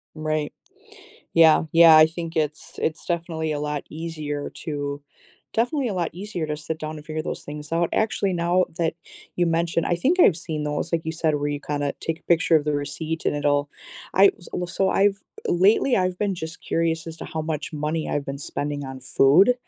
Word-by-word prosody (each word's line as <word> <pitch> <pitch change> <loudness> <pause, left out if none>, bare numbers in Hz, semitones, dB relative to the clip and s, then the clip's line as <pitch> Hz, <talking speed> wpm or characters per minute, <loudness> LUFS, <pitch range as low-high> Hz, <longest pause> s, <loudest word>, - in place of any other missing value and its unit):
Right. 155 -1 -2 0.8
Yeah, 160 -2 +7
yeah, 165 -1 +8
I 155 0 +9
think 165 +1 -6
it's 150 -1 -2
it's 160 -1 -2
definitely 165 -2 -2
a 145 - -3
lot 150 -1 -3
easier 155 -2 -4
to 145 -2 -3 0.5
definitely 250 +3 +1
a 205 - -3
lot 175 -2 -1
easier 180 -3 -4
to 150 0 -3
sit 155 +1 -5
down 155 0 -5
and 150 0 -11
figure 155 0 -3
those - - -5
things 150 +1 -8
out. 170 0 +2
Actually, 200 -3 +1
now 175 +2 +2
that 165 -2 +1 0.4
you 175 - +2
mention 165 0 +1
I - - +2
think 315 - +2
I've 175 - +6
seen 155 -3 -4
those, 150 +3 -3
like 165 -1 +1
you 160 - -1
said, 160 -2 +1
where 145 0 -1
you 145 0 -3
kinda 145 -1 -2
take 165 0 -3
a - - -39
picture 165 -1 +4
of 150 - 0
the 150 -1 0
receipt, 160 +3 -3
and - - +2
it'll 145 0 +1 0.4
I 195 +1 +7 0.2
wa 180 - -2
s 175 - -10
so 190 -1 +2
I've 195 -1 +2 0.3
lately 205 +8 +4
I've 185 -1 0
been 205 -2 0
just 160 -2 -7
curious 165 -1 -1
as 165 -1 -7
to - - -7
how 160 - -4
much 155 0 -4
money 155 +1 -2
I've 145 -1 -2
been 140 0 -4
spending 145 0 -4
on 130 -1 -7
food, 145 - +5
160 Hz, 205 wpm, -24 LUFS, 150-175 Hz, 0.8 s, I